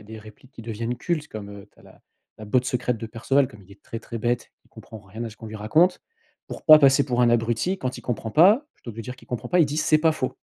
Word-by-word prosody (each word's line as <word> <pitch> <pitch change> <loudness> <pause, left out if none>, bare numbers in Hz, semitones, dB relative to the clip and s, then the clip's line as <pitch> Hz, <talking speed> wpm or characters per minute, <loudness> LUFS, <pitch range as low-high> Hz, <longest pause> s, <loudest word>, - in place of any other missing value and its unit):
a - - -14
des 110 +1 -10
répliques 110 +5 -16
qui 115 - -11
deviennent 115 +2 -4
cultes 155 +2 -3
comme 105 -2 -8
heu, 100 0 -12
tu - - -31
as - - -19
la - - -19 0.4
la 110 - -9
botte 125 +4 +1
secrète 125 -2 -1
de 115 - -6
Perceval: 130 +4 0
comme 105 -2 -15
il 95 - -22
est 100 - -19
très, 115 - -7
très 115 0 -8
bête, 120 +1 -2
il - - -29
comprend 110 - -12
rien 105 +4 -8
à 115 - -6
ce 105 - -15
qu'on 110 - -9
lui 110 0 -8
raconte, 160 - +2 0.4
pour - - -9
pas 155 -2 +10
passer 140 -1 +5
pour 125 -2 0
un 120 - +4
abruti 120 +11 0
quand 130 -1 -4
il - - -11
comprend 115 -2 -4
pas, 200 - +5
plutôt 120 - -10
que 110 - -14
de - - -5
dire 125 +3 -8
qu'il - - -19
comprend 120 -3 -5
pas, 180 -1 +3
il - - +6
dit: 145 +2 -4
«C'est 155 - +3
pas 160 0 +3
faux». 130 -4 -4
120 Hz, 295 wpm, -24 LUFS, 110-140 Hz, 0.4 s, pas